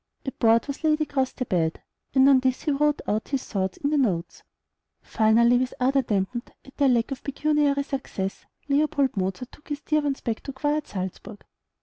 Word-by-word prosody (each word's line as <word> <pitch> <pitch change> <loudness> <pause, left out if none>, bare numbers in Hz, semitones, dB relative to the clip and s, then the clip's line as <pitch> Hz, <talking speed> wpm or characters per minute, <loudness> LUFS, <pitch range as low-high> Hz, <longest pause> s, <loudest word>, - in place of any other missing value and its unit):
A 270 - -2
board 230 -1 +3
was 280 +2 -6
laid 310 -1 +3
across 275 -4 0
the 255 - -4
bed, 165 -6 0 0.4
and 265 0 +6
on 275 -2 +6
this 255 0 0
he 300 - +1
wrote 295 +1 +1
out 215 +1 -1
his 275 -2 -2
thoughts 190 -2 -2
in 285 - -1
the 300 - +2
notes. 185 -10 -1 0.6
Finally, 235 +2 +4
with 255 0 -2
ardor 270 +2 +3
dampened 225 +1 -2
at 270 - -16
their 280 -2 +4
lack 235 0 +1
of 270 - -5
pecuniary 290 0 +1
success, 265 -9 -5 0.2
Leopold 285 -2 +1
Mozart 195 +5 -3
took 295 - -18
his 290 0 -4
dear 305 -1 +1
ones 285 -2 -1
back 230 -3 -2
to 275 - -7
quiet 295 +3 -1
Salzburg. 190 +3 -6
265 Hz, 195 wpm, -25 LUFS, 225-285 Hz, 0.6 s, and